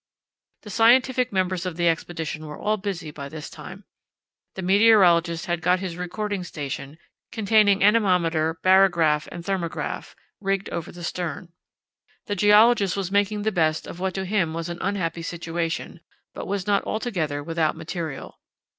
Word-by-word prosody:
The 210 - -9
scientific 250 +3 +4
members 185 -2 0
of 180 -3 -4
the 175 -1 +2
expedition 160 -1 -2
were 150 - -8
all 215 +1 0
busy 190 -6 -5
by 140 -1 -8
this 155 0 -8
time. - - -10 0.7
The 190 - -5
meteorologist 180 -4 +4
had 175 -3 -2
got 180 +2 +2
his 185 -3 -5
recording 190 +2 -3
station, 145 -3 -6 0.3
containing 210 -2 +3
anemometer, 175 -7 +2
barograph, 175 -5 +4
and 170 - -7
thermograph, 185 -3 -3 0.2
rigged 195 -1 -2
over 170 - -4
the 175 0 -10
stern. 175 0 -4 0.8
The 205 - -2
geologist 210 0 +5
was 190 -2 -3
making 205 +1 +1
the 220 - +1
best 160 -4 +1
of 175 - -9
what 190 0 -2
to 190 0 -2
him 185 -5 0
was 165 +1 -4
an 175 0 -6
unhappy 180 -4 -2
situation; 165 0 -4 0.3
but - - -7
was 195 -1 -2
not 205 -1 +2
altogether 170 -11 -2
without 165 0 0
material. 160 -4 -6
180 Hz, 155 wpm, -24 LUFS, 165-200 Hz, 0.8 s, geologist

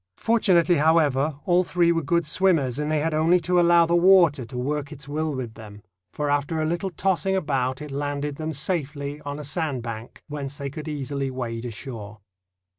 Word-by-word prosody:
Fortunately, 185 -7 +3
however, 150 -2 +2
all 180 0 +3
three 170 -1 +2
were 165 -1 +1
good 170 +3 +1
swimmers, 150 -6 +1
and 150 +1 -1
they 155 -1 +1
had 160 +1 -1
only 165 +4 +3
to 180 +2 +2
allow 170 -1 +5
the 170 +1 +1
water 170 -7 +5
to 125 +2 -8
work 145 +3 -2
its 140 -2 -10
will 155 0 -2
with 120 -4 -5
them, 105 -2 -12 0.3
for 150 - -3
after 145 +3 0
a 155 - 0
little 170 +4 -1
tossing 190 +2 0
about 135 -5 -1
it 150 - -8
landed 145 0 -3
them 155 0 -3
safely 145 -2 -3
on 145 0 -5
a 150 - -6
sand 145 -4 -2
bank, 115 0 -8
whence 145 -2 -5
they 140 -2 -5
could 155 +2 -7
easily 140 -2 -3
wade 120 -2 -4
ashore. 110 -3 -7
150 Hz, 190 wpm, -24 LUFS, 135-170 Hz, 0.3 s, allow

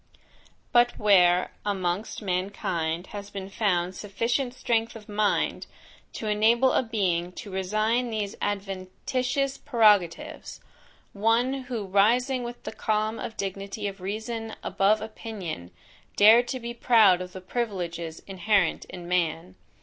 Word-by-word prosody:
But, 240 -1 +4
where, 180 -3 +4
amongst 195 +1 -2
mankind 180 -3 -2
has 205 -1 -6
been 195 -1 -7
found 185 -4 0
sufficient 230 +6 -2
strength 230 -2 0
of 215 -2 -11
mind 210 0 0 0.5
to - - -6
enable 225 +5 +3
a - - +3
being 185 -7 -1
to 200 - -9
resign 215 +6 0
these 210 -3 -3
adventitious 205 +8 -2
prerogatives; 215 - +2 0.5
one 230 +5 +2
who 235 -5 -4
rising 240 +7 +3
with 240 0 -7
the - - -5
calm 215 0 -1 0.2
dignity 195 +1 -4
of 195 -1 -7
reason 220 +3 -4
above 210 +2 +2
opinion, 210 - -6 0.5
dared 225 +4 +7
to 260 - -3
be 235 0 -5
proud 220 -6 +5
of 180 0 -7
the 185 - -7
privileges 175 -7 -4
inherent 195 -2 +1
in 175 -2 -9
man? 165 - -1
205 Hz, 125 wpm, -26 LUFS, 185-230 Hz, 0.5 s, dared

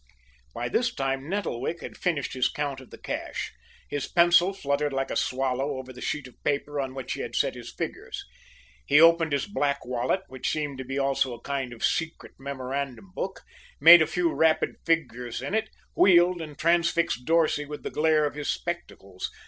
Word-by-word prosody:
By 120 +1 -2
this 235 - +1
time 135 - -2
Nettlewick 170 -5 -2
had - - -8
finished 160 -7 -1
his 130 -1 +2
count 140 -2 -3
of 130 - -15
the - - -11
cash. - - -5 0.3
His 145 -2 -3
pencil 175 +1 +5
fluttered 145 -5 -1
like 135 0 -1
a - - -2
swallow 135 +2 -1
over 130 0 -8
the 125 - -11
sheet 150 -3 -3
of 125 - -20
paper 145 0 -1
on 130 -1 -5
which 135 -2 -4
he - - -5
had - - -5
set - - +2
his - - -9
figures. - - -5 0.6
He 145 - +6
opened 165 -1 +6
his 140 -1 0
black 145 -8 -1
wallet, 125 +8 0
which 130 -1 -3
seemed 145 -3 -2
to - - -3
be 135 +2 -4
also 135 -2 +1
a 120 - -16
kind 135 -2 -3
of 120 - -2
secret 165 0 -2
memorandum 140 +4 -5
book, 190 0 -4 0.4
made 165 +3 +10
a 160 - +3
few 170 +1 0
rapid 160 -1 +2
figures 125 -7 0
in - - -5
it, 220 -1 0 0.2
wheeled 175 -1 +5
and 150 -2 -8
transfixed 170 -3 +2
Dorsey 160 -2 +2
with 150 0 -8
the - - -4
glare 155 0 +3
of 145 - -2
his 150 0 -4
spectacles. 100 - -4
145 Hz, 190 wpm, -27 LUFS, 130-165 Hz, 0.6 s, made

